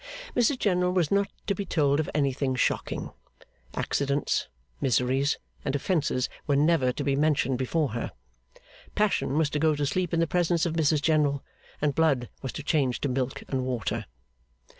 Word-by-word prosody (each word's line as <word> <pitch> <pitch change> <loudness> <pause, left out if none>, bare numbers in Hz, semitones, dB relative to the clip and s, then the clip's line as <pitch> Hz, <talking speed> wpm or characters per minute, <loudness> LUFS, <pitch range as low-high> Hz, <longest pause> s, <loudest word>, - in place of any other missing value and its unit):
Mrs 245 +3 +3
General 180 -5 +2
was 175 -5 +1
not 200 0 +2 0.2
to 200 - +1
be 200 - -3
told 145 -6 +2
of 155 - -1
anything 135 -2 +1
shocking. 125 - -1 0.6
Accidents, 140 0 0 0.3
miseries, 130 +3 +2 0.3
and 135 - -1
offences, 145 -4 0 0.2
were 145 - +3
never 145 -3 +3
to 145 - -4
be 140 -1 +1
mentioned 140 -3 +2
before 145 +3 0
her. 120 +1 -4 0.8
Passion 205 -9 +1
was 155 -2 +2
to 150 - 0
go 155 0 +3
to 145 0 -1
sleep 180 +4 -1
in 165 - +1
the 165 - +4
presence 175 0 +1
of 170 - -1
Mrs 155 -2 +2
General, 150 -3 +2 0.4
and 145 -1 +2
blood 140 -7 +2
was 130 - -4
to 150 - -6
change 140 -5 +1
to 145 - 0
milk 130 0 -2
and 130 -2 -1
water. 125 -5 -2
145 Hz, 170 wpm, -27 LUFS, 135-165 Hz, 0.8 s, the